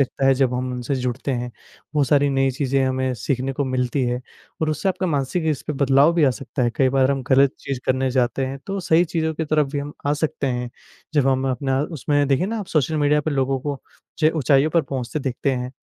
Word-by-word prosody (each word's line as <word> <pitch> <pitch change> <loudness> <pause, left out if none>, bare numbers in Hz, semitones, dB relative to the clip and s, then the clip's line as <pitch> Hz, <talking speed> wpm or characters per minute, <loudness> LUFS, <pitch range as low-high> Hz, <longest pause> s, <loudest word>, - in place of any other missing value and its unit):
लगता 135 0 0
है, 135 - +5
जब 130 -2 +1
हम 125 0 -2
उनसे 125 +2 -3
जुड़ते 125 +1 -2
हैं। 120 -1 -3 0.4
बहुत 145 -2 +3
सारी 145 -1 +4
नई 135 0 +2
चीज़ें 135 +1 0
हमें 130 0 0
सीखने 130 +3 -2
को 140 +2 -1
मिलती 130 +1 -1
है 125 0 -1 0.4
और 155 - +1
उससे 155 +6 -1
आपका 185 0 -1
मानसिक 150 +2 -1
इस 150 - -3
पे 150 - -1
बदलाव 140 +3 +4
भी 165 -3 +4
आ 135 - +4
सकता 125 +2 -4
है। 120 - +2
कई 135 - +4
बार 135 0 +3
हम 135 -1 -1
गलत 135 0 +5
चीज़ 135 -3 -4
करने 130 0 +1
जाते 130 +1 0
हैं, 135 +1 -5
तो 195 0 -3
सही 170 -1 +3
चीज़ों 160 -1 -1
की 160 - -2
तरफ 150 -1 +2
भी 145 - -1
हम 145 +1 -5
आ 145 - +2
सकते 150 -2 -1
हैं। 125 -1 -2 0.4
जब 145 -3 +3
हम 130 0 +1
अपना, 135 +1 0
उसमें 145 -2 0
देखें 140 +6 +2
ना 225 +2 -3
आप, 205 - -5
सोशल 155 -1 0
मीडिया 150 0 +3
पर 155 - -2
लोगों 135 -1 0
को 140 -1 -4 0.4
जे 155 -1 +4
ऊँचाइयों 140 +1 +3
पर 170 0 +3
पहुँचते 130 -1 -4
दिखते 135 +1 -1
हैं, 125 0 -3
135 Hz, 240 wpm, -22 LUFS, 130-150 Hz, 0.4 s, है